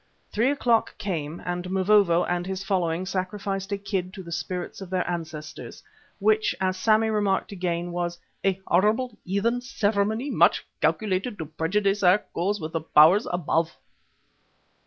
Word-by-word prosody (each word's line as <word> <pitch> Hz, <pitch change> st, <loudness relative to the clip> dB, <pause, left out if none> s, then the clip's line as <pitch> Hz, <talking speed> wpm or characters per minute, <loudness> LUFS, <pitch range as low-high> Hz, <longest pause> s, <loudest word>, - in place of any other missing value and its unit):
Three 230 Hz, +5 st, +2 dB
o'clock 240 Hz, -5 st, +1 dB
came 165 Hz, -5 st, -4 dB
and 180 Hz, 0 st, -3 dB
Mavovo 190 Hz, -2 st, +4 dB
and 175 Hz, 0 st, -2 dB
his 190 Hz, 0 st, -3 dB
following 180 Hz, -3 st, 0 dB
sacrificed 195 Hz, +1 st, -3 dB
a 200 Hz, -, 0 dB
kid 190 Hz, -2 st, -3 dB
to 190 Hz, -, -8 dB
the 170 Hz, -, -10 dB
spirits 175 Hz, +4 st, -4 dB
of 190 Hz, -, -7 dB
their 185 Hz, -1 st, -1 dB
ancestors, 155 Hz, -7 st, -6 dB, 0.3 s
which, 215 Hz, +1 st, +2 dB
as 185 Hz, -1 st, 0 dB
Sammy 220 Hz, +3 st, +3 dB
remarked 205 Hz, -3 st, 0 dB
again, 175 Hz, -2 st, -2 dB
was 175 Hz, 0 st, -2 dB, 0.3 s
"a 195 Hz, -1 st, +1 dB
horrible, 215 Hz, +7 st, +2 dB
heathen 225 Hz, +6 st, 0 dB
ceremony 220 Hz, +1 st, 0 dB
much -, -, +3 dB, 0.2 s
calculated 205 Hz, +1 st, 0 dB
to 160 Hz, -, -4 dB
prejudice 195 Hz, +6 st, 0 dB
our 180 Hz, +1 st, +6 dB
cause 205 Hz, +1 st, -3 dB
with 160 Hz, 0 st, -6 dB, 0.2 s
Powers 175 Hz, +10 st, +7 dB
Above." 165 Hz, -1 st, 0 dB
190 Hz, 145 wpm, -25 LUFS, 175-210 Hz, 0.3 s, Powers